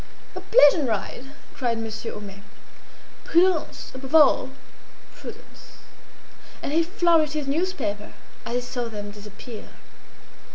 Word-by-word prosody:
"A - - -5
pleasant 290 - +6
ride!" 220 +4 -3 0.3
cried 240 -3 -1
Monsieur 225 0 -5
Homais. 200 -1 -9 0.8
"Prudence! 345 -1 +2
above 265 +3 -4
all, 290 -4 +6 0.7
prudence!" - - -12 0.9
And 285 - -2
he 330 - +4
flourished 335 -3 +2
his 305 -2 -2
newspaper 275 - -2 0.3
as 235 - -4
he 245 - +1
saw 245 0 -4
them 205 -2 -6
disappear. 210 +2 -10
260 Hz, 115 wpm, -25 LUFS, 215-320 Hz, 0.9 s, pleasant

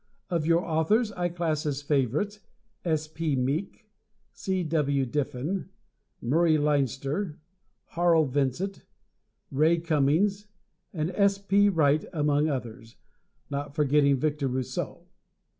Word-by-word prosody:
Of 165 -3 0
your 170 +1 +3
authors 205 +8 +2
I 175 -2 -2
class 165 -3 -1
as 145 -1 -2
favorites 145 - 0 0.4
S. 155 -2 0
P. 155 -2 -2
Meek, 150 - -2 0.4
C. 190 -1 -2
W. 145 -4 +1
Diffin, 145 +7 -3 0.5
Murray 155 +5 +3
Leinster, 145 - 0 0.5
Harl 170 -2 +3
Vincent, 145 +8 -1 0.7
Ray 155 +5 +3
Cummings 165 +6 +1 0.4
and 160 0 -2
S. 200 +1 +2
P. 200 +1 +3
Wright 155 -4 +3
among 150 -1 +2
others, 115 -4 -5 0.6
not 140 0 -4
forgetting 145 -1 +3
Victor 150 0 -1
Rousseau. 130 0 -4
155 Hz, 110 wpm, -27 LUFS, 140-175 Hz, 0.7 s, your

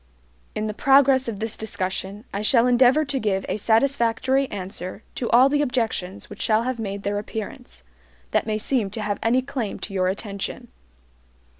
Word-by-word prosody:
In 215 - -2
the 215 - -3
progress 270 +1 +4
of 215 -4 -4
this 225 0 -3
discussion 195 0 -3
I 200 - -2
shall 230 +2 +4
endeavor 250 +4 +4
to 275 -1 -2
give 195 -4 -1
a - - -1
satisfactory 260 +3 +2
answer 185 +1 -6
to 240 - -3
all 250 +3 +6
the 290 +1 +1
objections 225 -8 -2
which - - -10
shall 220 +1 +2
have 255 -1 -3
made 200 -2 -4
their 205 0 -1
appearance, 200 - -7 0.5
that - - +1
may 215 -1 0
seem 220 -1 0
to 215 +3 -5
have 205 -1 -2
any 250 +3 +2
claim 260 -6 -4
to 200 - -6
your 185 -1 +1
attention. 200 +1 -4
220 Hz, 175 wpm, -23 LUFS, 200-255 Hz, 0.5 s, all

